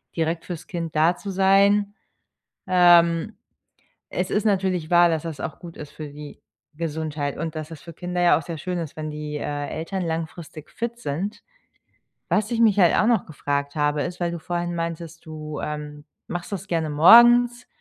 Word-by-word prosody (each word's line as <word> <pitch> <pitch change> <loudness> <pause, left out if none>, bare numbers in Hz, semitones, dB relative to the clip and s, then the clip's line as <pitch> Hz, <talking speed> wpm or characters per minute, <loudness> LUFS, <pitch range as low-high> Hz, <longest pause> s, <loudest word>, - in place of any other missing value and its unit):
direkt 165 0 -1
für‘s 175 -4 -7
Kind 165 -5 -5
da 165 +3 +3
zu 200 - -6
sein. 200 +2 +3 0.7
Ähm, 175 +1 +4 0.7
es 180 0 -3
ist 210 - 0
natürlich 185 -5 0
wahr, 175 0 +6
dass 160 -1 -1
das 160 -4 -6
auch - - -5
gut 170 -2 -11
ist 150 -1 -9
für 155 -1 -8
die 145 0 -11 0.3
Gesundheit 155 -3 -3
und 165 -1 -4
dass 155 +1 -6
es 155 - -10
für 170 - -10
Kinder 180 +2 -4
ja 175 - +5
auch - - -7
sehr 165 +2 -6
schön 180 +3 -4
ist, 160 -3 -6
wenn 155 0 -4
die, 150 0 -5
äh, 145 -1 -3
Eltern 185 +4 -4
langfristig 160 -1 -6
fit 235 0 -5
sind. 180 +5 -4 0.9
Was 215 +1 +1
ich 235 -1 -1
mich 215 -3 +4
halt 175 -3 +5
auch 215 - +3
noch 230 -4 +2
gefragt 145 -1 -3
habe, 145 0 +1
ist, 180 +1 -5
weil 175 - 0
du 170 - -5
vorhin 175 +1 -3
meintest, 165 -1 -5
du, 155 -1 -7
ähm, 150 -1 -6 0.2
machst 175 +3 -6
das 195 -1 -5
gerne 160 -2 -1
morgens 240 +9 +6
170 Hz, 185 wpm, -23 LUFS, 155-185 Hz, 0.9 s, wahr